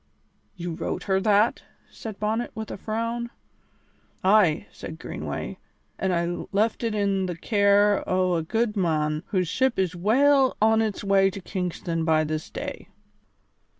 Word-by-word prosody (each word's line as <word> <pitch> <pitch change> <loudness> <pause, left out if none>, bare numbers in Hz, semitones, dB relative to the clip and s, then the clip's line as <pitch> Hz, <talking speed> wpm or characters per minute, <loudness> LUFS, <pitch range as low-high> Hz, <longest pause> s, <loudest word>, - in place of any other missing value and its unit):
"You 175 -2 -5
wrote - - -4
her 190 -1 +1
that?" 210 +2 +3 0.3
said 220 -3 -8
Bonnet, 220 +3 -1
with 220 -1 -5
a - - -5
frown. 230 +3 -3 0.9
"Ay," 190 -3 +4
said 160 - -8
Greenway, - - -5 0.4
"an' 190 - 0
I 170 0 -1
left 215 +4 +1
it 225 -2 -1
in 195 -2 +1
the 175 -2 -4
care 205 +1 +3
o' 185 -1 +2
a 165 - +1
good 225 +6 -1
mon, 155 -5 0
whose 185 -3 0
ship 260 +8 +1
is 185 -2 0
weel 265 +8 +3
on 220 +1 +4
its 215 -3 -2
way 195 -1 +4
to 195 +1 -7
Kingston 175 -3 -3
by 160 -1 +3
this 155 0 -3
day." - - -6
200 Hz, 150 wpm, -25 LUFS, 175-220 Hz, 0.9 s, Ay